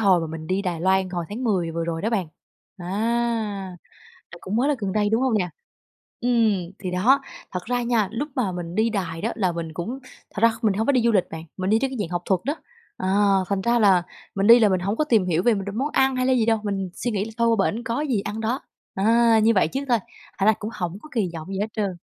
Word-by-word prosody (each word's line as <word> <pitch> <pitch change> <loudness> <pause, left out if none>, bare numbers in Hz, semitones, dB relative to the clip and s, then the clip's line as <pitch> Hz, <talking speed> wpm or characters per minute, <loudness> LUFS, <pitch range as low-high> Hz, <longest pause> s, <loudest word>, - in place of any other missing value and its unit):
hồi 190 -5 +4
mà 165 - -3
mình 155 0 -7
đi 190 +3 0
Đài 175 -4 -3
Loan, 190 0 +2
hồi 175 -2 -3
tháng 230 +5 -5
10 185 -7 +1
vừa 165 0 -3
rồi 165 0 -3
đó 220 - 0
bạn, 200 -7 0 0.5
à, 175 - -8 1.4
à, 170 - -11
cũng 195 +3 -4
mới 250 +4 +2
là 295 - +2
gần 200 -3 -2
đây, 210 -1 +1
đúng 225 +4 +2
hông 255 -5 +2
nè? 180 -3 -1 0.7
Ừm, 220 -7 +1
thì 185 - -4
đó, 245 +10 +3 0.3
thật 180 - -2
ra 245 +1 0
nha, 235 -4 +1
lúc 250 +6 -3
mà 230 -7 0
mình 175 -1 -6
đi 220 +2 +2
Đài 180 -6 -3
đó 225 +4 -1
là 190 -6 +1
mình 165 -2 -5
cũng 200 +11 -4 0.3
thật 205 - -5
ra 230 - +7
kh - - -29
mình 215 -3 +3
hông 220 +3 -1
có - - +5
đi 255 -3 +3
du 235 0 +3
lịch 195 -5 +3
bạn, 160 0 -6
mình 185 0 -1
đi 220 - +4
trên 270 - 0
cái 260 - -5
dạng 190 - -2
học 175 0 -2
thuật 190 -3 +1
đó. 290 +3 0 0.4
À, 185 - -2 0.4
thành 200 -1 0
ra 235 +3 +2
là 190 -5 +5 0.3
mình 195 +1 +1
đi 235 +1 +9
là 215 -3 +5
mình 185 -1 +1
hổng 200 +5 -2
có - - +2
tìm 225 -10 +2
hiểu 175 -1 +1
về 240 - +4
m 195 -2 -2
đ - - -4
món 265 +7 -1
ăn 265 0 +3
hay 255 0 0
là 260 - +3
gì 240 -3 +2
đâu, 225 -1 +2
mình 195 -2 -2
suy 245 - -2
nghĩ 205 -2 -1
là 225 - -8
thôi 235 0 +3
qua 195 - +2
bển 230 +3 -5
có 230 +4 -2
gì 260 -9 0
ăn 210 +2 -5
đó. 235 +5 -1 0.3
À, 230 +3 +4
như 230 +1 +5
vậy 190 - +3
trước 270 - -3
thôi, 240 - +4 0.4
thành 195 - 0
ra 220 - +7
cũng 215 - -4
hổng 180 -4 -4
có 305 - -13
kỳ 205 -6 +1
vọng 160 -1 -7
gì 195 0 -4
hết 210 - 0
trơn. 200 -5 -2
205 Hz, 280 wpm, -23 LUFS, 185-235 Hz, 1.4 s, đi